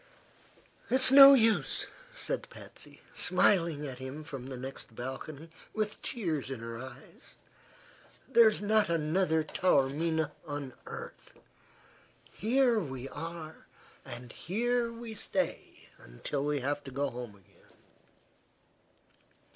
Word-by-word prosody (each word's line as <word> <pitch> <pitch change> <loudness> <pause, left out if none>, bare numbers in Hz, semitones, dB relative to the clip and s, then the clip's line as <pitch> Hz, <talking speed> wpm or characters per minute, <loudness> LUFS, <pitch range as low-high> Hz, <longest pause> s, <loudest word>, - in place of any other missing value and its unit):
"It's 260 0 +4
no 275 0 +11
use," 225 -4 +2 0.3
said - - -3
Patsy, - - -11
smiling 170 -4 +2
at 130 -2 -7
him 130 +4 -6
from 135 -5 -7
the 130 -1 -6
next 130 -3 -8
balcony 140 +6 -7 0.2
with 215 -1 -2
tears 165 - -2
in 135 -3 -5
her 115 0 -6
eyes; 130 +2 -12 0.9
"There's 230 -5 +5
not 210 -2 +3
another 160 0 +2
Taormina 160 -1 +1
on 145 -4 -5
earth. - - -9 1.0
Here 240 +1 +3
we 135 -7 -5
are, 160 +1 -8 0.4
and 120 -2 -8
here 235 +5 0
we 230 -1 -7
stay 215 - -3
until 135 - -4
we 145 -2 0
have 145 +2 -1
to 135 - -7
go 140 +1 -1
home 120 -4 -7
again." 95 -3 -24
155 Hz, 115 wpm, -31 LUFS, 135-210 Hz, 1.0 s, no